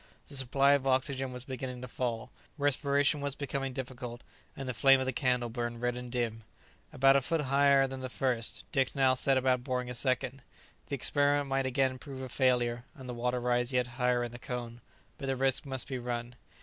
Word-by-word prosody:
The 145 - -5
supply 135 +1 +3
of 140 -1 +3
oxygen 130 0 0
was 125 0 -7
beginning 130 -2 -5
to - - -5
fail, 120 -1 -3 0.3
respiration 145 0 +2
was 140 -1 -2
becoming 140 -1 -3
difficult, 125 -2 -6 0.4
and 135 -1 -5
the 125 - -2
flame 135 +3 +6
of 130 - -1
the 130 - -1
candle 125 -1 +1
burned 120 0 -4
red 120 0 0
and 125 0 -7
dim. 115 -3 -2 0.5
About 135 +1 +5
a 140 - +4
foot 165 +4 0
higher 140 0 +4
than 135 0 -5
the 130 0 -5
first 125 -3 -1
hole, - - -29
Dick 135 -4 +1
now 135 -2 +4
set 135 +1 +2
about 130 -1 +2
boring 125 -2 -2
a - - -4
second. 130 +2 +1 0.5
The 140 - -2
experiment 145 +1 +1
might 135 0 +1
again 130 0 +1
prove 135 -1 -7
a 130 - -6
failure, 120 -2 +1
and 130 -4 -10
the 125 - -4
water 125 +1 -1
rise 120 +1 +1
yet 125 -1 +2 0.2
higher 125 0 +3
in 120 - -4
the 120 - -9
cone; 120 -1 -6 0.4
but 135 - -4
the 135 - +1
risk 135 +1 +1
must 130 -2 0
be 130 -2 -3
run. 120 0 -4
130 Hz, 215 wpm, -31 LUFS, 125-135 Hz, 0.5 s, flame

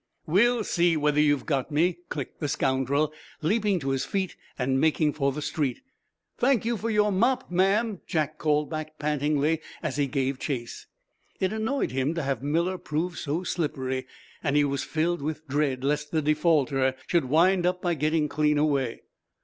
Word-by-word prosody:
"We'll 225 +8 +3
see 170 -4 +2
whether 150 0 +2
you've 145 -2 +2
got 140 -4 -1
me!" 170 +3 +1
clicked 140 -4 -5
the 150 - -1
scoundrel, 140 +3 +1 0.3
leaping 205 +2 +2
to 135 - -2
his 135 -1 0
feet 190 -2 -2 0.2
and 130 +1 +1
making 155 -1 +2
for 140 -2 +1
the 150 +2 -5
street. 145 - -2 0.6
"Thank 250 -3 +3
you 235 0 +1
for 225 +1 -3
your 210 -1 +3
mop, 245 +4 +1
ma'am," 195 +3 +2
Jack 155 -1 -1
called 150 -1 +1
back, 155 -1 -6
pantingly, 150 +1 +1 0.2
as 150 -3 -2
he 145 -1 +2
gave 135 0 -1
chase. 120 -4 -4 0.5
It 190 +2 0
annoyed 220 - -1
him 135 +5 0
to 165 - -2
have 135 -3 -1
Miller 170 +6 0
prove 165 +4 -2
so 155 +4 -2
slippery, 135 -7 -2 0.4
and 145 -3 +1
he 145 - +5
was 140 -1 -1
filled 165 +1 -1
with 155 +1 -4
dread 135 -2 0
lest 150 +1 0
the 155 -1 0
defaulter 145 -4 +2
should 170 -6 +1
wind 175 +6 +3
up 180 0 0
by 175 -1 +2
getting 155 0 +1
clean 150 0 +1
away. 140 -5 0
155 Hz, 175 wpm, -27 LUFS, 140-175 Hz, 0.6 s, he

